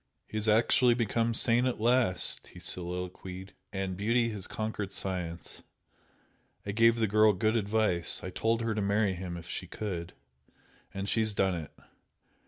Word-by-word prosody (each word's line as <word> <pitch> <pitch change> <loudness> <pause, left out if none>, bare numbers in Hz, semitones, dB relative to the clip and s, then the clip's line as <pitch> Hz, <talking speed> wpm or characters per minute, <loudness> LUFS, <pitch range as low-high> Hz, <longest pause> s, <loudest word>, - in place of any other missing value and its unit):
"He - - -11
has 110 0 0
actually 120 +3 +4
become 115 0 0
sane 120 +3 +2
at 125 - -2
last!" 115 -7 +2
he 90 - -13
soliloquised, 90 +1 -4 0.2
"And 95 -1 -3
beauty 115 +4 +1
has 100 -4 -6
conquered 110 -2 -4
science! 90 -3 -4 1.0
I 100 - -2
gave 115 +2 +4
the 115 -1 +1
girl 110 +1 +4
good 110 +4 +1
advice 105 -5 +2
I 95 - -5
told 115 +4 0
her 115 -1 -1
to 105 - -2
marry 100 0 +1
him 90 -1 -5
if 85 0 -10
she - - -4
could, 90 -6 -5 0.8
and 95 +1 -4
she's 110 -1 +1
done 95 -1 +2
it! 80 -4 -5
105 Hz, 160 wpm, -30 LUFS, 90-115 Hz, 1.0 s, actually